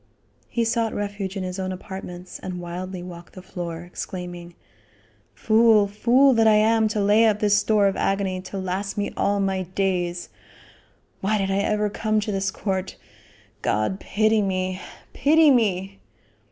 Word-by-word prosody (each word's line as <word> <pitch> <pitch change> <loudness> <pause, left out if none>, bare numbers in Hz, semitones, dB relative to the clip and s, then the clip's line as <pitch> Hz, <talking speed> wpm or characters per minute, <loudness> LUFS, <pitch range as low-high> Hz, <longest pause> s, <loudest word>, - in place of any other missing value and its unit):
He 235 -1 0
sought 230 -1 0
refuge 205 -1 -4
in 190 - -3
his 185 +1 -5
own 185 0 -2
apartments 185 -1 -8
and 185 -1 -6
wildly 180 +1 -6
walked 175 -1 -11
the 185 - -10
floor, 175 -2 -6
exclaiming, 175 -1 -7 0.8
"Fool! 220 -1 +4
fool 245 +7 +4
that 225 -2 +4
I 215 - +6
am 220 +1 +3
to 215 0 -2
lay 210 +3 +4
up 210 -2 +2
this 210 -1 +3
store 205 0 +3
of 195 - +2
agony 195 -2 -1
to 185 +1 -7
last 190 +2 -3
me 205 - -2
all 200 0 +1
my 195 -1 0
days. 180 -1 -2 0.9
Why 215 +3 0
did 195 -1 -1
I 195 - +1
ever 210 +1 +1
come 215 0 0
to 210 - -3
this 195 -1 -1
court? 190 -1 -3 0.7
God 110 - 0
pity 215 +1 +1
me 185 -1 -2 0.3
pity 310 +1 +5
me!" 195 -5 0
195 Hz, 160 wpm, -23 LUFS, 185-215 Hz, 0.9 s, I